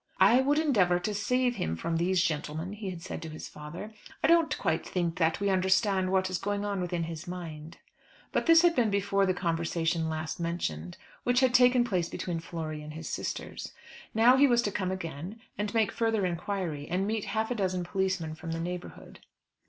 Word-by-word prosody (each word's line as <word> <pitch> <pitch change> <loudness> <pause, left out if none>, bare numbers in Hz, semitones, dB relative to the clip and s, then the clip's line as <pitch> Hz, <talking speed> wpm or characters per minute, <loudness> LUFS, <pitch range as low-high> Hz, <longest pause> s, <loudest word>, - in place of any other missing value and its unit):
"I 250 +2 +6
would 285 +3 +2
endeavour 205 - +3
to 210 +4 -2
save 250 +4 +1
him 80 +1 -1
from 165 - -2
these 180 +1 +2
gentlemen," 155 +3 -2
he 205 -2 -5
had 175 -2 -7
said 185 - -6
to 165 - -6
his 155 - -7
father. 150 +8 -8 0.3
"I - - +5
don't 330 -1 +4
quite 160 - 0
think 175 -2 -2
that 165 +1 +2
we 200 0 +1
understand 190 0 +2
what 190 -1 +2
is 185 -1 -2
going 205 +1 -2
on 200 -2 -1
within 175 -1 -1
his 165 +1 -6
mind;" 165 -3 -7 0.5
but - - 0
this 330 0 +7
had 345 -1 +5
been 235 -5 +3
before 200 -1 +1
the 185 - +1
conversation 165 -1 0
last 155 0 -4
mentioned 90 - -3 0.2
which 245 +1 +2
had 255 -2 +3
taken 250 0 +6
place 185 -8 -1
between 175 -2 -3
Flory 160 -2 -5
and 150 0 -9
his 160 +1 -6
sisters. - - -5 0.4
Now 235 +4 +5
he 285 +1 +6
was 240 -2 +3
to 205 - -1
come 190 -2 -1
again, 185 +2 -5 0.2
and 210 0 -2
make 220 -2 +2
further 225 -4 +1
inquiry, 175 -4 -3
and 185 +3 0
meet 215 0 -1
half 220 +1 -1
a - - 0
dozen 185 -4 -1
policemen 185 -3 -1
from 165 +1 -6
the 165 - -3
neighbourhood. 175 +1 -6
185 Hz, 200 wpm, -29 LUFS, 165-210 Hz, 0.5 s, this